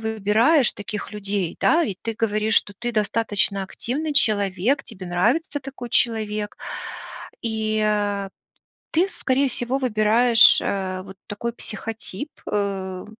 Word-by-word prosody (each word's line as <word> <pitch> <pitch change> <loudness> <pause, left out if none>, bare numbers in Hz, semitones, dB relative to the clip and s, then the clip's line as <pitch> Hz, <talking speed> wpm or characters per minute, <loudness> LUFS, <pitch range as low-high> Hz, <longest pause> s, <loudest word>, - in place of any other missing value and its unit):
выбираешь 220 +6 +3
таких 205 0 -6
людей, 200 -4 -2
да, 330 +1 +4
ведь 190 -6 -4
ты 225 - -2
говоришь, 215 0 0
что 205 - +2
ты 240 0 -3
достаточно 210 -2 +1
активный 285 +10 -3
человек, 210 +2 +2
тебе 190 -5 -9
нравится 235 - +1
такой 265 -2 -8
человек. 215 -3 0 0.9
И, 220 -1 -1
а, 205 -2 0 0.6
ты, 345 +4 +3
скорее 270 -2 +1
всего, 245 +2 -1
выбираешь, 230 0 +5
э, 185 -2 -2
вот 190 0 -11
такой 225 +3 -3
психотип, 225 +4 -5 0.2
э, 195 -2 -2
215 Hz, 125 wpm, -23 LUFS, 200-240 Hz, 0.9 s, выбираешь